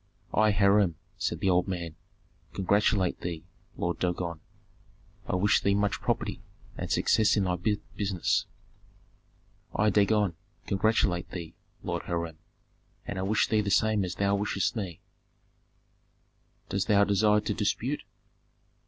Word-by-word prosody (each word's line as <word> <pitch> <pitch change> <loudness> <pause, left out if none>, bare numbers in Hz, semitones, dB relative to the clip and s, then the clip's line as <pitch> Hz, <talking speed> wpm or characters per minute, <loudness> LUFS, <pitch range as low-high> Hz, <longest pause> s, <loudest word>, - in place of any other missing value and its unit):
"I, 110 0 +4
Hiram," 100 -3 +4 0.2
said 85 0 -2
the 95 - +3
old 90 0 +2
man, 85 -4 -4 0.6
"congratulate 100 -1 +1
thee, 85 -2 -4 0.3
Lord 85 0 -2
Dagon. 90 -2 -2 0.9
I - - 0
wish 100 +3 +3
thee 100 0 +2
much 100 0 0
property, - - -1 0.3
and - - -5
success 110 0 +3
in 100 - +3
thy 90 -1 0 0.4
business." 95 -4 0 1.3
"I, 105 0 +3
Dagon, 105 -2 +3 0.3
congratulate 95 -3 +1
thee, 85 -3 -7 0.3
Lord 85 -1 -2
Hiram, 85 -2 -3 0.7
and 100 - -4
I - - -1
wish 100 +3 +2
thee 110 -1 +2
the 100 - -2
same 110 0 +3
as 90 -1 -4
thou 100 0 +1
wishest 100 +1 0
me 95 -7 -5 0.8
" - - -41
"Dost 95 0 -1
thou 100 -1 +5
desire 105 +1 +3
to - - -2
dispute?" - - -1
100 Hz, 135 wpm, -28 LUFS, 90-105 Hz, 1.3 s, thou